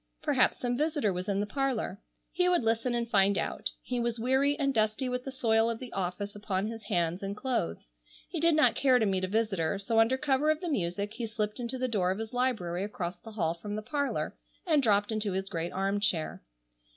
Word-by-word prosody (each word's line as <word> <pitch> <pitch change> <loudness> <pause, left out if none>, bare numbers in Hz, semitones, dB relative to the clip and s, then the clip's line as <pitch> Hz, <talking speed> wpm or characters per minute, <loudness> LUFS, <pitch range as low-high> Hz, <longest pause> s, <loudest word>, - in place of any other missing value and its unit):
Perhaps 280 -4 +3
some 245 -1 -1
visitor 295 - +1
was 180 +2 -4
in 200 0 +1
the - - 0
parlor. 235 -5 -2 0.3
He 360 0 +2
would 350 -7 +3
listen 230 +2 +1
and 235 -1 -1
find 200 -3 +3
out. - - -2
He 250 -1 -2
was 235 -1 -1
weary 265 +4 +2
and 275 -2 +1
dusty 220 +3 +1
with 250 0 -3
the 270 - -4
soil 225 -3 +2
of 230 - -2
the 250 0 -9
office 195 +2 -3
upon 205 -2 -2
his 225 +1 -5
hands 175 -3 0
and 200 +1 -4
clothes. 85 - -2 0.4
He 340 - -3
did 335 0 +4
not 310 - +5
care 260 -2 +4
to 225 - +2
meet 190 -2 0
a - - -4
visitor, 200 -5 0
so 225 +3 +1
under 230 +4 +4
cover 285 +1 +2
of 310 0 +2
the 350 - -3
music 200 - -1
he 230 0 -4
slipped 215 0 -3
into 245 +2 -3
the 255 0 0
door 200 -7 +1
of 190 - 0
his 220 +1 -5
library 215 -9 0
across 180 -4 -4
the 220 +4 -11
hall 165 -6 0
from 205 +5 -6
the 215 - -4
parlor 285 +3 -2 0.3
and 310 -5 +4
dropped 205 -3 +3
into 215 -3 -1
his 190 +1 -2
great 165 +1 -3
arm 195 +2 0
chair. 175 -6 0
220 Hz, 225 wpm, -30 LUFS, 195-255 Hz, 0.4 s, not